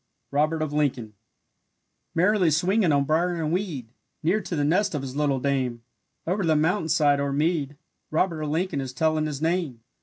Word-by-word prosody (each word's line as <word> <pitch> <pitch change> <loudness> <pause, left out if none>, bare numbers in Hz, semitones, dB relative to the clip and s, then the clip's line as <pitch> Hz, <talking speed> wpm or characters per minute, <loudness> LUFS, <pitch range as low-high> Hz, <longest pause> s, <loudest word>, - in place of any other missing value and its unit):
ROBERT 155 +3 +1
OF 150 -1 -4
LINCOLN 125 -7 -1 1.0
Merrily 185 +1 +3
swinging 180 +4 +2
on 140 -1 +3
brier 170 +5 +1
and 160 -2 -2
weed, 155 - -3 0.3
Near 185 +7 +2
to 175 - -4
the 145 - 0
nest 175 +4 +1
of 140 - -3
his 135 -1 -6
little 145 -2 +1
dame, 130 -3 -1 0.4
Over 190 +4 0
the 160 -2 +3
mountainside 155 -3 +2
or 140 0 -1
mead, 150 -1 0 0.3
Robert 165 0 0
of 150 - -2
Lincoln 160 -2 -1
is 130 -1 -6
telling 155 +3 +1
his 150 0 -5
name. 165 -9 -1
155 Hz, 175 wpm, -25 LUFS, 140-170 Hz, 1.0 s, Merrily